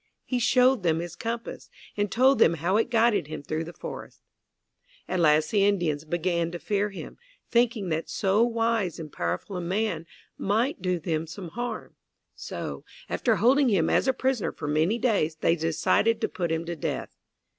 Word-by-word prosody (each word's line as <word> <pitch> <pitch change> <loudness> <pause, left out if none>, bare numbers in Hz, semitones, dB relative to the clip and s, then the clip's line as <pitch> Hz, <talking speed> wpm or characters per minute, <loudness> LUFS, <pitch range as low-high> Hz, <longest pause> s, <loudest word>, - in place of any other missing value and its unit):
He 250 - -1
showed 250 0 +4
them 165 -3 +2
his 170 0 -6
compass 230 +3 -5 0.3
and 205 -1 -1
told 260 +3 +4
them 165 - +5
how 170 +5 0
it 225 - +1
guided 230 - +3
him 155 -2 -7
through 155 +3 -3
the 170 - -8
forest. - - -9 0.8
At 185 - -1
last 155 -1 +3
the 205 -2 +3
Indians 175 -7 +1
began 170 +1 0
to - - -3
fear 205 +3 -1
him, 195 - -9 0.3
thinking 235 -5 +2
that 160 0 -2
so 195 +3 +1
wise 230 -6 +1
and 155 -3 -8
powerful 90 - -3
a - - -3
man 175 -2 -2 0.3
might 225 +5 0
do 180 -1 0
them 160 -1 -2
some 175 +2 -8
harm. 240 +3 -5 0.4
So, - - -6 0.3
after 230 -3 +1
holding 255 +5 +4
him 175 -7 +2
as - - +2
a - - +5
prisoner 260 -3 -1
for - - -7
many 160 +9 +2
days, 205 -11 +1
they 165 +1 +2
decided 170 +7 +1
to - - +1
put 175 -3 -3
him 165 +1 -1
to 170 0 -4
death. 160 - -4
190 Hz, 180 wpm, -26 LUFS, 165-230 Hz, 0.8 s, them